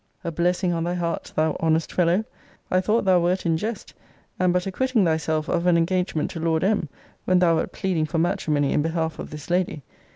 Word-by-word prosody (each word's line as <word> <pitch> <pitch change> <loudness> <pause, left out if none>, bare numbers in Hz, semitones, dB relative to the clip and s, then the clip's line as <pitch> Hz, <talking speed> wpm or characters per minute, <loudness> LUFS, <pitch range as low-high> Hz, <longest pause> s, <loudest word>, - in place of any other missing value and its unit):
A 170 - -3
blessing 175 +2 +1
on 165 -1 -1
thy 175 +1 -1
heart, 170 -1 -3
thou 155 0 +1
honest 160 0 +1
fellow! 180 +4 +2 0.5
I 185 - +3
thought 215 +3 +1
thou 185 -2 +5
wert 180 +2 0
in 165 -1 +2
jest, 215 +5 -4 0.5
and 185 -1 +3
but 180 0 0
acquitting 225 +2 +1
thyself 160 -1 0
of 170 +1 0
an 175 -1 +5
engagement 175 -1 0
to 165 - -6
Lord 160 0 0
M. 195 -6 +1 0.4
when 185 - +3
thou 170 -2 +4
wert - - -2
pleading 175 -6 -1
for 160 - -3
matrimony 150 -4 +1
in - - +2
behalf 160 0 -2
of - - -6
this 150 +2 -8
lady! 175 -5 0
170 Hz, 205 wpm, -24 LUFS, 160-185 Hz, 0.5 s, thou